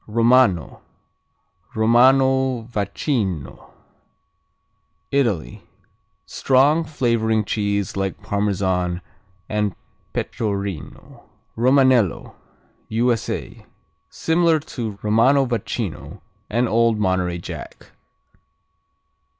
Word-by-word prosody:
Romano, 115 - +2 0.9
Romano 130 +2 +3
Vacchino 100 - -3 1.4
Italy 110 - -1 0.6
Strong: 145 +5 +2
flavoring 115 -7 0
cheese 100 -2 -1
like 95 -1 -3
Parmesan 95 -4 -1 0.5
and 105 -2 -1 0.4
Pecorino. 100 - -5 0.3
Romanello 130 - +3 0.6
U.S.A. 115 +1 -2 0.4
Similar 165 -1 +2
to 115 -8 -6
Romano 125 +6 +3
Vacchino 120 -2 -4 0.3
and 120 +3 +1
Old 115 0 +2
Monterey 95 -3 0
Jack. 85 - -9
110 Hz, 65 wpm, -21 LUFS, 100-130 Hz, 1.4 s, Romano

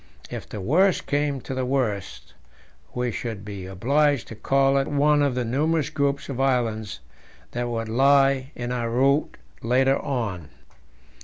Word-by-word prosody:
If - - -7
the 105 - -6
worst 180 - +2
came 145 -2 -1
to 135 - -6
the 130 0 -2
worst, 125 -7 -2 0.6
we 125 -1 -1
should 110 -3 -5
be 100 -3 -7
obliged 140 +8 +1
to 115 - -8
call 135 +4 +2
at 135 - -1
one 145 +1 +3
of 140 -3 +1
the 125 -1 -1
numerous 150 +6 0
groups 140 -1 -1
of 135 -2 -3
islands 115 -7 -1 0.5
that 120 0 -3
would 115 -1 -3
lie 135 +2 +3
in 120 0 -4
our 120 -2 -2
route 135 +5 +1 0.2
later 130 +3 +2
on. 105 - -3
130 Hz, 155 wpm, -24 LUFS, 115-140 Hz, 0.6 s, one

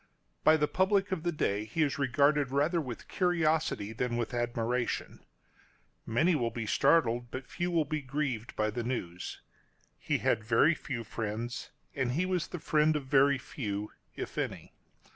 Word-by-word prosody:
By 160 - +6
the 150 -1 +2
public 195 +3 +2
of 185 -4 -1
the 175 +1 0
day 105 -9 0
he 135 +9 0
is 145 -1 -1
regarded 140 +1 +3
rather 150 +6 +2
with 125 -6 -7
curiosity 160 - +1
than 120 +1 -1
with 120 0 -2
admiration. 120 0 -2 0.8
Many 155 +11 +3
will 120 -7 +1
be 115 -1 -4
startled, 120 -1 +3
but 130 +1 -6
few 175 0 -2
will 165 -3 +2
be 155 +1 -2
grieved 130 -4 -3
by 110 0 +1
the 120 +2 -3
news. 90 -8 -4 0.6
He - - 0
had 110 - +1
very 120 +9 +4
few 125 -7 -5
friends, 115 +3 -4 0.2
and 130 -3 -1
he 170 +7 +1
was 185 -3 -1
the - - -6
friend 155 -1 +2
of 145 -3 -2
very 140 +1 +4
few 105 -8 -4
— - - -45
if - - -5
any. - - -4
135 Hz, 170 wpm, -31 LUFS, 120-155 Hz, 0.8 s, By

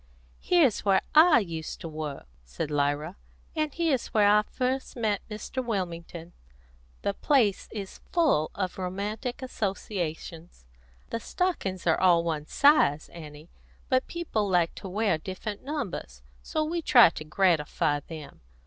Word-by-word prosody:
"Here's 325 - +3
where 195 -2 +3
I 315 +1 +7
used 165 -5 -6
to - - -5
work," 155 -3 -6 0.2
said 65 - -5
Lyra, 145 +4 -1 0.4
"and 310 -1 0
here's 315 -5 0
where 210 -3 +3
I 210 +1 +6
first 255 +4 -3
met 215 -4 0
Mr. 215 +4 -4
Wilmington. 170 -6 -4 0.7
The 200 - 0
place 225 -6 +2
is 200 -3 -7
full 300 - +2
of 185 -1 -3
romantic 205 +7 -4
associations. 175 - -4 0.5
The 230 - -2
stockings 230 - -2
are 165 -2 +3
all 175 -2 +5
one 155 -3 -3
size, 280 - +4
Annie; 155 -1 -11 0.4
but 255 0 +2
people 225 -12 -2
like 175 -3 +2
to 195 - -8
wear 200 -4 +1
different 195 +4 -6
numbers, 205 - -5 0.2
and - - -21
so 310 - 0
we 335 +2 -2
try 240 - +7
to 155 - -7
gratify 155 -3 +1
them. 155 0 -10
195 Hz, 140 wpm, -27 LUFS, 160-250 Hz, 0.7 s, I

